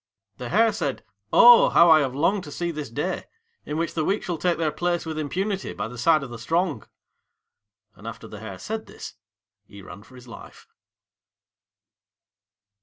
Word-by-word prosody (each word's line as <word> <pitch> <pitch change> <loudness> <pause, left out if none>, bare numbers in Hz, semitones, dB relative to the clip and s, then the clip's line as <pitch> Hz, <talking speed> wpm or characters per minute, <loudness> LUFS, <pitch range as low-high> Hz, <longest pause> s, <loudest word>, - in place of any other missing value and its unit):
The 125 -1 -7
Hare 225 +2 +3
said, 145 -10 -3 0.3
"Oh, 240 0 +8
how 170 0 +6
I 160 - +7
have 135 -3 -2
longed 185 +7 +1
to 145 - -10
see 170 +3 -3
this 150 -4 -6
day, 150 +10 -3 0.4
in 150 - -3
which 165 0 -2
the 160 - -1
weak 200 +6 -1
shall 175 -3 -4
take 175 0 0
their 160 -2 0
place 175 +3 -2
with 160 -1 -4
impunity 190 +6 -3
by 105 +1 -4
the 125 +2 -10
side 155 +3 +3
of 130 - -8
the 120 - -8
strong." 165 +10 -1 1.1
And - - -13
after - - -8
the - - -10
Hare - - -8
said 220 0 -6
this, - - -10 0.5
he 100 -1 -14
ran 100 - -11
for 130 +5 -18
his 125 0 -14
life. 115 - -13
160 Hz, 180 wpm, -24 LUFS, 135-180 Hz, 1.1 s, Oh